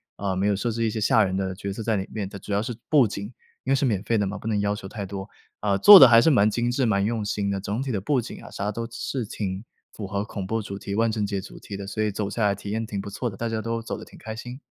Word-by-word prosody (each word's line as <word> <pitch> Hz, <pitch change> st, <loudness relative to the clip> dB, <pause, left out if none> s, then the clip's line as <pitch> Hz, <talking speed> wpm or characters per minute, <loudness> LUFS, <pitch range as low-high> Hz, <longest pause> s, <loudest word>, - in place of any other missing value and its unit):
啊， 100 Hz, -1 st, -2 dB
没 100 Hz, +2 st, +1 dB
有 100 Hz, -, +2 dB
设 115 Hz, +4 st, -1 dB
置 115 Hz, +1 st, -2 dB
一 -, -, +2 dB
些 110 Hz, -, -3 dB
吓 110 Hz, +1 st, +4 dB
人 95 Hz, 0 st, -2 dB
的 95 Hz, -1 st, -1 dB
角 100 Hz, 0 st, -5 dB
色 115 Hz, -, -6 dB
在 110 Hz, -1 st, +1 dB
里 95 Hz, -, -3 dB
面， 105 Hz, -3 st, -3 dB
它 100 Hz, -, -8 dB
主 100 Hz, -, -9 dB
要 100 Hz, +1 st, +2 dB
是 120 Hz, +2 st, -4 dB, 0.2 s
布 145 Hz, -6 st, +6 dB
景， 100 Hz, 0 st, -5 dB, 0.4 s
因 135 Hz, -, -2 dB
为 -, -, +5 dB
是 135 Hz, -, +1 dB
免 105 Hz, -6 st, +1 dB
费 115 Hz, +1 st, +1 dB
的 100 Hz, -, +1 dB
嘛， 105 Hz, -, -4 dB
不 -, -, -13 dB
能 105 Hz, -2 st, +1 dB
要 100 Hz, 0 st, 0 dB
求 100 Hz, -, -9 dB
太 100 Hz, 0 st, -5 dB
多， 95 Hz, +1 st, -6 dB, 0.3 s
啊， 100 Hz, -2 st, +1 dB
做 205 Hz, -, +11 dB
得 135 Hz, -8 st, +10 dB
还 115 Hz, 0 st, +8 dB
是 160 Hz, -, +4 dB
蛮 110 Hz, -7 st, +4 dB
精 120 Hz, +2 st, 0 dB
致、 125 Hz, +1 st, +1 dB
蛮 100 Hz, -2 st, +2 dB
用 110 Hz, -1 st, -1 dB
心 100 Hz, -1 st, -1 dB
的， 100 Hz, -1 st, -2 dB
总 105 Hz, +5 st, -3 dB
体 135 Hz, -, -3 dB
的 100 Hz, -6 st, -1 dB
布 135 Hz, +4 st, +1 dB
景 115 Hz, -, -7 dB
啊 -, -, -11 dB
啥 100 Hz, +1 st, -3 dB
都 115 Hz, +2 st, -3 dB
是 125 Hz, -1 st, -3 dB
挺 100 Hz, -1 st, -4 dB, 0.3 s
符 105 Hz, -, -6 dB
合 100 Hz, +2 st, -2 dB
恐 100 Hz, -3 st, -5 dB
怖 115 Hz, +3 st, -1 dB
主 100 Hz, -1 st, -6 dB
题 100 Hz, -, -6 dB
万 115 Hz, +2 st, +2 dB
圣 105 Hz, -2 st, -1 dB
节 100 Hz, -1 st, -2 dB
主 -, -, -10 dB
题 100 Hz, -, -8 dB
的， 100 Hz, -1 st, -7 dB
所 110 Hz, +1 st, -2 dB
以 105 Hz, -, 0 dB
走 100 Hz, 0 st, -3 dB
下 110 Hz, +2 st, -2 dB
来 100 Hz, -, +3 dB
体 100 Hz, +1 st, -8 dB
验 110 Hz, +1 st, -2 dB
挺 100 Hz, -2 st, -4 dB
不 100 Hz, -, -5 dB
错 120 Hz, +4 st, -3 dB
的， 95 Hz, -, -10 dB
大 115 Hz, -, -2 dB
家 110 Hz, -1 st, -2 dB
都 115 Hz, +1 st, -2 dB
走 115 Hz, -, -5 dB
得 -, -, -9 dB
挺 -, -, -15 dB
开 110 Hz, 0 st, -7 dB
心。 125 Hz, +3 st, -8 dB
105 Hz, 355 characters per minute, -25 LUFS, 100-115 Hz, 0.4 s, 做